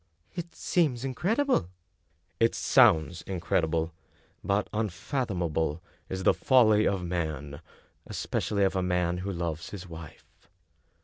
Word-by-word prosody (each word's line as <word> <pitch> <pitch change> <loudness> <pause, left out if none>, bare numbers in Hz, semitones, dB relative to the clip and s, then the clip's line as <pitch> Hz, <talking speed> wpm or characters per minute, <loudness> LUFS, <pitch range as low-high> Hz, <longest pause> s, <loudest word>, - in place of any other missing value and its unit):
" 80 - -39
It 170 -1 -6
seems 140 -8 +1
incredible! 180 - +1 0.3
" - - -43
" 85 - -43
It - - -10
sounds 90 - +4
incredible; 85 -3 -1 0.5
but 100 +1 +1
unfathomable 90 - -1 0.3
is 95 0 -3
the - - +5
folly 110 -5 +4
of 95 -3 -1
man, 75 -5 -3 0.5
especially 100 -2 -1
of 95 0 +2
a 95 - +1
man 90 -1 0
who 100 +2 -3
loves 85 -3 -3
his 95 -2 -8
wife." 85 +2 -12
90 Hz, 130 wpm, -28 LUFS, 85-110 Hz, 0.5 s, the